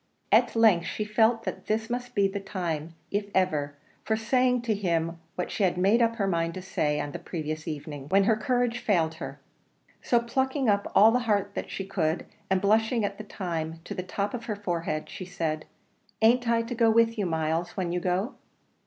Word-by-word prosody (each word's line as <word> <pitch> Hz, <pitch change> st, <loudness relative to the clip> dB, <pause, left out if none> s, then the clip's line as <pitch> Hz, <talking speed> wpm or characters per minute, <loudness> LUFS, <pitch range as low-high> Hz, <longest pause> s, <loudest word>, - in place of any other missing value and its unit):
At -, -, +4 dB
length 215 Hz, -7 st, +5 dB
she 215 Hz, -, -3 dB
felt 225 Hz, +2 st, +3 dB
that -, -, -5 dB
this 220 Hz, +1 st, 0 dB
must 245 Hz, +1 st, -4 dB
be 200 Hz, -2 st, +4 dB
the 200 Hz, +1 st, -4 dB
time, 170 Hz, -5 st, -4 dB, 0.2 s
if 205 Hz, 0 st, -1 dB
ever, 150 Hz, -6 st, +1 dB, 0.3 s
for 220 Hz, -, +1 dB
saying 250 Hz, +2 st, +2 dB
to 230 Hz, -2 st, +1 dB
him 170 Hz, -4 st, -1 dB, 0.2 s
what 180 Hz, -, -3 dB
she -, -, -3 dB
had 185 Hz, -2 st, +2 dB
made 200 Hz, +6 st, +4 dB
up 230 Hz, 0 st, +3 dB
her 205 Hz, -4 st, 0 dB
mind 170 Hz, -3 st, 0 dB
to 185 Hz, -, -5 dB
say 150 Hz, -5 st, 0 dB
on 145 Hz, 0 st, -3 dB
the -, -, -6 dB
previous 155 Hz, -2 st, -5 dB
evening, 145 Hz, -2 st, -6 dB
when 195 Hz, +3 st, +5 dB
her 220 Hz, +3 st, +4 dB
courage 245 Hz, +1 st, 0 dB
failed 170 Hz, -9 st, +1 dB
her. -, -, -6 dB, 0.6 s
So, 240 Hz, -, +3 dB
plucking 265 Hz, +3 st, 0 dB
up 200 Hz, -1 st, +1 dB
all 215 Hz, +2 st, +8 dB
the 250 Hz, -, +3 dB
heart 200 Hz, -1 st, +1 dB
she 195 Hz, -, -5 dB
could, 175 Hz, -4 st, -1 dB, 0.2 s
and 190 Hz, 0 st, +3 dB
blushing 220 Hz, +3 st, +2 dB
at 200 Hz, 0 st, -4 dB
the -, -, -5 dB
time 165 Hz, -5 st, -4 dB
to -, -, -6 dB
the -, -, -3 dB
top 200 Hz, +2 st, -3 dB
of 235 Hz, -2 st, -5 dB
her 215 Hz, -, -2 dB
forehead, 170 Hz, -6 st, -2 dB
she 185 Hz, -, -7 dB
said, 165 Hz, -4 st, -3 dB, 0.5 s
"An't 235 Hz, +2 st, +4 dB
I 230 Hz, 0 st, +3 dB
to 230 Hz, +2 st, -5 dB
go 230 Hz, -1 st, +3 dB
with 230 Hz, +1 st, +4 dB
you, 200 Hz, -, +1 dB
Myles, 160 Hz, +1 st, -1 dB
when 180 Hz, -3 st, -1 dB
you 180 Hz, -, 0 dB
go?" 185 Hz, +7 st, -1 dB
200 Hz, 205 wpm, -27 LUFS, 170-225 Hz, 0.6 s, all